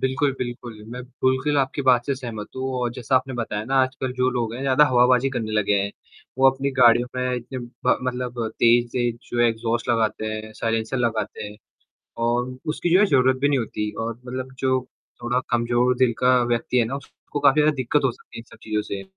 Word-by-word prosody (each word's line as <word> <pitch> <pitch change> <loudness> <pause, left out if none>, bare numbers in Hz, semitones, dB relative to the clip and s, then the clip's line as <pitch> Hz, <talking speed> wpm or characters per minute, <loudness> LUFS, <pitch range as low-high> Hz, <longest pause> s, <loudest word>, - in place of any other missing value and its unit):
बिल्कुल, 135 +1 +1
बिल्कुल। 120 -3 -6
मैं 125 - -6
बिल्कुल 130 +3 0
आपकी 135 +1 -1
बात 125 -2 +3
से 140 - 0
सहमत 115 -5 -7
हूँ 130 0 -3
और 120 -1 0
जैसा 125 +1 -2
आपने 130 0 -1
बताया 110 -3 -3
ना 135 +3 -2
आजकल 130 0 -3
जो 125 0 +1
लोग 115 -3 -2
हैं 130 - -6
ज़्यादा 135 +2 +5
हवाबाजी 125 0 +4
करने 115 -4 -3
लगे 105 -1 +2
हैं। 100 +1 -2 0.5
वो 135 - +6
अपनी 135 +1 -3
गाड़ियों 120 0 +6
में 125 0 0
इतने 125 +2 -6 0.3
ब - - +4
मतलब 125 -2 -3
तेज-तेज 120 0 +2
जो 120 - 0
है 120 - +5
एक्सहॉस्ट 115 +1 -2
लगाते 110 -1 0
हैं, 110 0 -5
साइलेंसर 115 +3 -2
लगाते 115 -4 -2
हैं 105 0 -9 0.7
और 125 +2 -1
उसकी 160 +2 -1
जो 185 - +7
है 210 - +5
ज़रूरत 130 -4 +3
भी 145 - +3
नहीं 140 - +2
होती 105 -2 -3
और 115 +1 -2
मतलब 130 +1 -5
जो 130 -1 +1 0.4
थोड़ा 125 +1 0
कमज़ोर 120 +1 +2
दिल 125 -2 +3
का 125 0 +4 0.2
व्यक्ति 120 +1 0
है 120 - +4
ना 135 +5 -3
उसको 140 +1 -8
काफ़ी 150 +1 +5
ज़्यादा 150 0 +3
दिक्कत 135 +3 0
हो 130 - +3
सकती - - -16
है - - -5
इन - - -14
सब - - -15
चीज़ों 105 -1 -1
से। 100 -1 -5
125 Hz, 215 wpm, -23 LUFS, 115-130 Hz, 0.7 s, जो